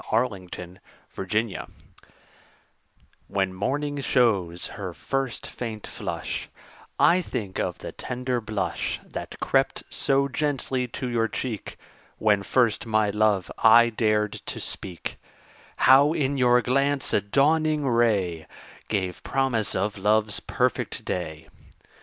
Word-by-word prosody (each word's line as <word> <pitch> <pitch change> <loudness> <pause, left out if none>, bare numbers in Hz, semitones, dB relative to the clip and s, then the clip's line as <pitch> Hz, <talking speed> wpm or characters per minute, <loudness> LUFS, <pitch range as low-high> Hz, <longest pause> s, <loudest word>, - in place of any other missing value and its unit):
MORNING, 110 -6 0
NOON 90 +1 -9 0.5
AND - - -5
NIGHT 95 - -7 1.6
When 95 -1 0
morning 145 +9 -2
shows 100 -11 +2
her 95 -3 -6
first 135 -2 -3
faint 110 -3 -6
flush, - - -5 0.5
I 180 +2 +5
think 100 - -4
of - - -1
the - - -7
tender 125 -1 -3
blush 105 -4 -2
That - - -7
crept - - +1
so 140 0 +2
gently 135 -2 -1
to 125 +2 -5
your 115 -2 +1
cheek 115 -2 -5 0.4
When 105 -2 +3
first 115 +2 +1
my 110 -2 +2
love 105 -2 +2
I 115 +1 +7
dared 105 -2 +1 0.2
to - - -4
speak; 90 -3 -5 0.6
How, 140 +4 +6
in 140 -3 0
your 125 -2 +4
glance, 140 +3 +1
a - - +4
dawning 150 +6 +2
ray 105 -9 +1 0.4
Gave 95 -4 -2
promise 130 -6 0
of 100 +1 -1
love's 105 +1 +2
perfect - - -1
day. 80 -3 -4
115 Hz, 125 wpm, -25 LUFS, 100-130 Hz, 1.6 s, I